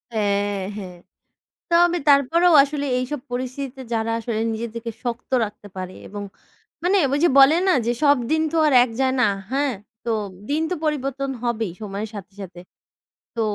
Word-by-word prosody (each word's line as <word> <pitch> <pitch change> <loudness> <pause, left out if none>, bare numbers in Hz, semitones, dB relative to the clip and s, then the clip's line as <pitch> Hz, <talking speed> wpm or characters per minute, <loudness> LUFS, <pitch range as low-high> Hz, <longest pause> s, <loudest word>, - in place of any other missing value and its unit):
হ্যাঁ, 205 -1 0 0.2
হ্যাঁ। 185 -3 -8 0.7
তবে 345 +1 +4
তারপরেও 315 +5 +5
আসলে 285 0 -3
এইসব 255 +3 -3
পরিস্থিতিতে 255 +1 -4
যারা 225 0 -1
আসলে 225 -1 -3
নিজেদেরকে 230 +1 -5
শক্ত 240 +1 -4
রাখতে 205 -1 -9
পারে 185 0 -6
এবং 205 0 -6 0.6
মানে, 375 +3 +3
ঐ - - +3
যে - - +6
বলে 275 +4 +8
না? 370 - +5
যে 240 - +2
সব 285 0 +6
দিন 315 0 +2
তো 330 - -1
আর 295 - +3
এক 250 - -7
যায় 260 -1 +2
না, - - +4 0.2
হ্যাঁ? 275 -2 +1 0.3
তো 230 - +1 0.4
দিন 310 +2 +1
তো 365 - +1
পরিবর্তন 275 -2 -2
হবেই 225 -6 -1
সময়ের 210 +1 -5
সাথে 205 0 -9
সাথে। 180 -2 -9 0.8
তো 230 - -1
245 Hz, 165 wpm, -22 LUFS, 215-285 Hz, 0.8 s, বলে